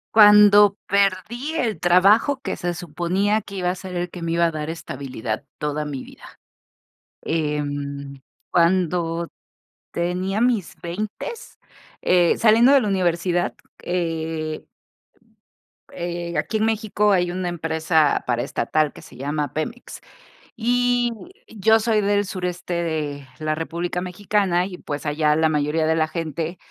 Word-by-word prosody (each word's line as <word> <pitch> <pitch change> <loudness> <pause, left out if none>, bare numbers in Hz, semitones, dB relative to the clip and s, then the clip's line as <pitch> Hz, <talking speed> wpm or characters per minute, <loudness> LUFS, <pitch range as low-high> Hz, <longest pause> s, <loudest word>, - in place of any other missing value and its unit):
Cuando 205 -1 +8
perdí 200 - 0
el 230 -8 0
trabajo 200 +10 +4
que - - -4
se 175 -2 -2
suponía 175 +6 -1
que 200 -1 -11
iba 180 -1 0
a 180 - -1
ser 185 -1 -7
el 175 0 -2
que 175 0 -9
me 165 - -2
iba 170 0 +3
a 165 - +1
dar 155 -1 -4
estabilidad 130 -8 -5
toda 150 0 -2
mi 145 -3 -5
vida. - - -15 0.8
Em, 145 -3 -3 0.3
cuando 170 -1 +1 0.6
tenía 180 +4 -1
mis 235 -6 +1
veintes, 215 - -6 0.4
eh, 175 -2 +3
saliendo 230 +3 +5
de 280 - +7
la 225 - -1
universidad, 175 -2 0 0.3
eh 160 -3 -3 1.3
eh, 175 -1 -4
aquí 220 - -1
en 215 - +1
México 215 -1 +1
hay 180 -2 +2
una 180 0 -2
empresa 160 -2 +1
paraestatal 125 +5 0
que - - -12
se - - -15
llama 145 +1 -3
Pemex 225 +11 -5 0.6
y 245 +1 +2 0.4
yo 220 +1 +3
soy 220 -1 +1
del 205 0 +1
sureste 180 -2 -4
de 155 -5 -3
la 155 0 -1
República 170 +3 -3
Mexicana 185 -1 0
y, 185 -2 -8
pues, 145 +1 -5
allá 150 0 +2
la 160 0 +3
mayoría 150 +1 0
de 160 - +2
la 155 -1 +1
gente 165 +1 -4
175 Hz, 135 wpm, -22 LUFS, 155-205 Hz, 1.3 s, Cuando